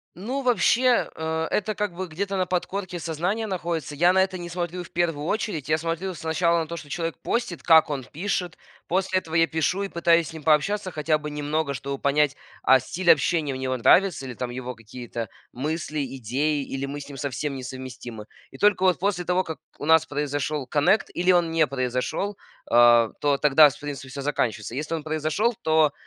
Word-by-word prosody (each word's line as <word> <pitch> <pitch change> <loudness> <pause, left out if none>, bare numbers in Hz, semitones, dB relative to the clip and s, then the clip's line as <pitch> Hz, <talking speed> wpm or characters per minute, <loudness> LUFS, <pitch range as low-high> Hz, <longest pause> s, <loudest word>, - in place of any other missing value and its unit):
Ну, 250 +10 -3
вообще, 245 +1 +3
э, 160 0 -2
это, 215 +1 0
как 205 -2 -2
бы, 185 +1 -3
где-то 195 +5 -3
на 185 -1 +1
подкорке 180 0 -3
сознания 175 +8 -2
находится. 170 -6 -3
Я 175 +4 +5
на 190 0 +4
это 190 -1 0
не 175 -1 -7
смотрю 175 0 -4
в - - -13
первую 165 -4 -1
очередь. 175 - -2
Я 155 - +3
смотрю 165 +3 -3
сначала 170 +1 +1
на 160 - -2
то, 170 - -5
что 155 -3 -9
человек 165 +2 -3
постит, 235 -8 -2
как 160 -2 +6
он 140 -3 -3
пишет. 180 +4 -3 0.3
После 185 +1 +1
этого 160 -2 -8
я 165 0 +5
пишу 165 +5 0
и - - -2
пытаюсь 170 -2 +2
с - - -9
ним 160 -2 -9
пообщаться 185 +6 +2
хотя 155 0 +1
бы 150 0 -6
немного, 150 0 -1
чтобы 140 0 -4
понять, 145 +1 +2 0.3
а, 130 0 +6
стиль 180 +5 -2
общения 155 -2 +3
у 130 - -4
него 130 -1 -2
нравится 175 +2 +4
или 130 - -6
там 125 +1 -4
его 125 0 -6
какие-то 115 0 -7 0.2
мысли, 150 +1 -2
идеи, 140 +5 0
или 135 0 -4
мы 145 +1 -5
с 140 - -9
ним 140 - -9
совсем 140 +1 -3
несовместимы. 125 -4 -8 0.3
И 135 - -12
только 205 +2 +3
вот 185 -4 +3
после 185 -2 0
того, 180 +1 +1
как 160 - -6 0.2
у - - -5
нас 160 0 +5
произошел 145 -1 -2
коннект, 150 - +2
или 180 +1 +3
он 175 -2 +3
не 165 -1 +3
произошел, 130 +10 -2 0.3
а, 120 -1 +6
то 145 -1 +2
тогда, 150 +1 +6
в - - -11
принципе, 140 -3 -6
всё 140 +1 -6
заканчивается. 115 -6 -2
Если 150 +4 -3
он 160 - -3
произошел, 155 +9 0
то, 155 -2 +3
160 Hz, 200 wpm, -25 LUFS, 140-180 Hz, 0.3 s, как